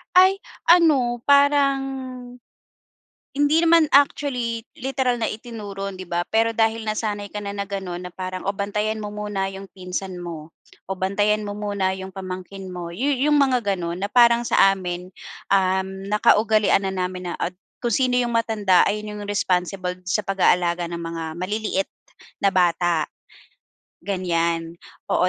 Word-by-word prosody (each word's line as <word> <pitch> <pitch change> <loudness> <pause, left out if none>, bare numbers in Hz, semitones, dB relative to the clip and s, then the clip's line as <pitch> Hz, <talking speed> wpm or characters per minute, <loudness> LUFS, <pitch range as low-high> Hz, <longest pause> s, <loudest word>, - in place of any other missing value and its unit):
Ay 380 +2 +6 0.2
ano, 280 -9 +4
parang 280 0 +4 1.6
hindi 290 +2 +3
naman 335 -1 +5
actually 250 -5 +2
literal 265 -3 0
na 225 - +1
itinuro, 205 -4 -6
'di 185 - -7
ba, 175 0 -1
pero 225 +1 +2
dahil 225 0 +1
nasanay 215 -1 -3
ka 210 - -4
na 200 -1 -5
na 200 - -2
gano'n 185 -3 -4
na 180 - -7
parang, 185 0 -5
"Oh, 195 - 0
bantayan 210 +2 -1
mo 210 - -5
muna 205 -2 -2
'yong 195 0 -8
pinsan 185 0 -5
mo. 165 -3 -7 0.4
Oh, 190 - -3
bantayan 205 +3 +1
mo 205 - -4
muna 200 -2 -1
'yong 190 0 -7
pamangkin 190 +1 -7
mo." 180 -2 -6
Yu 265 +11 0
yung 295 +3 +3
mga 260 -3 +3 0.2
gano'n 170 +1 -4
na 200 - -1
parang 235 -1 +6
sa 195 -4 +5
amin, 180 -1 -5 0.5
uhm, 190 0 0
nakaugalian 215 -1 +4
na 190 - -1
namin 180 -1 -3
na - - -3
at 180 - -2 0.3
kung 240 -2 -1
sino 250 0 +2
'yong 240 -1 0
matanda 220 -5 +3
ayun 210 0 -4
'yong 205 - -7
responsible 180 -2 -1
sa 190 +3 0
pag-aalaga 180 -2 +2
ng 170 0 -5
mga 165 -1 -5
maliliit 195 +1 -1 0.5
na 200 - +4
bata, 175 -3 +2 1.0
ganyan. 170 -3 -1 0.3
Oo, 180 - +2
200 Hz, 150 wpm, -23 LUFS, 185-230 Hz, 1.6 s, Ay